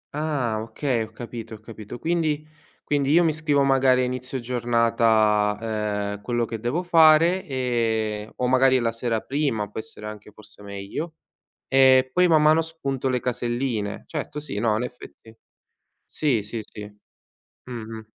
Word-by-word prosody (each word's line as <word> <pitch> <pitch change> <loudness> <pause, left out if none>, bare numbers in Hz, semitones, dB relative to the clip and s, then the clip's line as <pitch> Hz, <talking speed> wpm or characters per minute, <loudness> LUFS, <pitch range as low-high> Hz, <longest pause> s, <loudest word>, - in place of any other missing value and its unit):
Ah, 140 -8 -1
okay, 115 +2 -2
ho 110 - -16
capito, 115 -1 -8
ho - - -14
capito. 110 +1 -9
Quindi 155 -1 -1 0.4
quindi 140 -2 0
io 170 +4 +5
mi 160 -2 +2
scrivo 150 -2 +1
magari 135 -2 +4
a - - +2
inizio 125 +1 -3
giornata, 110 -3 +1
ehm, - - -22
quello 120 +1 -1
che 115 0 -6
devo 125 +11 -1
fare 165 +1 +5
e 115 -5 -1
o 125 - -1
magari 130 +1 +4
la 115 -2 0
sera 115 -1 -2
prima 135 -7 -1
può - - -5
essere 110 -3 -8
anche 105 0 -8
forse 105 0 -16
meglio 100 +11 -6 0.5
e 130 -1 +5
poi 180 0 +4
man 155 -3 +4
mano 155 +1 +5
spunto 140 -5 -3
le 125 -1 +1
caselline. 120 -3 -2
Certo, 150 -1 -5
sì, 145 -9 -5
no, 110 -1 +2
in 115 - -2
effetti 125 -2 -10 0.7
sì, 135 -8 0
sì, 105 +3 -6
sì. 105 0 -10 0.8
Mh-mh. 110 -2 -7
120 Hz, 155 wpm, -24 LUFS, 110-145 Hz, 0.8 s, io